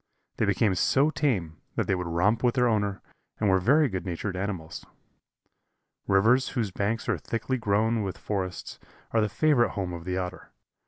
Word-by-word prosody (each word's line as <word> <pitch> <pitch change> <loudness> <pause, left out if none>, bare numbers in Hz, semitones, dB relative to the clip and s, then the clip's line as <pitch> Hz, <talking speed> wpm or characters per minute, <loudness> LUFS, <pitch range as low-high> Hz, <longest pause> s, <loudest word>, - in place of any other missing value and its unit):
They - - +2
became 105 -4 +2
so 135 - +3
tame 95 - -1 0.2
that - - 0
they - - +1
would 90 -2 -2
romp 90 +7 +1
with 125 0 +2
their 125 -1 +3
owner, 105 -3 0 0.4
and 105 -3 +2
were 95 - +4
very 140 +10 +4
good 95 -7 -4
natured 95 +2 -4
animals. 95 -4 -4 1.2
Rivers 115 +7 +4
whose 110 -5 0
banks 105 +5 -2
are - - 0
thickly 130 +3 -2
grown 110 +1 +1
with 95 -3 -4
forests 95 -4 -4 0.3
are 115 - +2
the 105 - +1
favorite 125 +2 +2
home 95 -4 -3
of 85 -1 -7
the 90 0 -2
Otter. 90 0 -5
100 Hz, 175 wpm, -27 LUFS, 95-115 Hz, 1.2 s, were